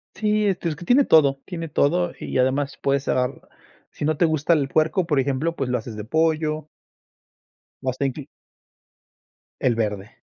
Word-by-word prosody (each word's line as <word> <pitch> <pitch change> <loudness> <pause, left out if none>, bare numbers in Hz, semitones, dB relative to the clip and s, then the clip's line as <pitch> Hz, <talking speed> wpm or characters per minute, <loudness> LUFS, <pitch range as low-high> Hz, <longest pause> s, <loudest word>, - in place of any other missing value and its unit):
Sí, 210 0 +1
este, 180 -4 0
es 155 - -3
que 175 +3 -10
tiene 265 +6 +4
todo, 140 -4 +4
tiene 165 -3 -6
todo 175 +5 +1
y - - -3
además 135 +2 0
puedes 140 0 0
cerrar 125 -2 0 0.6
si - - -5
no 155 +1 +1
te 170 - +3
gusta 155 +1 +2
el 145 -4 +1
puerco, 160 +4 +1
por 150 -5 +2
ejemplo, 140 +5 -1
pues, 135 -5 -2
lo 125 - +2
haces 115 -3 -8
de 105 - -6
pollo. 155 +3 0 1.2
O 130 - 0
hasta 130 +2 -2
inclu 135 +1 -3 1.4
El 125 -3 +2
verde. 105 -1 -3
150 Hz, 175 wpm, -23 LUFS, 130-165 Hz, 1.4 s, tiene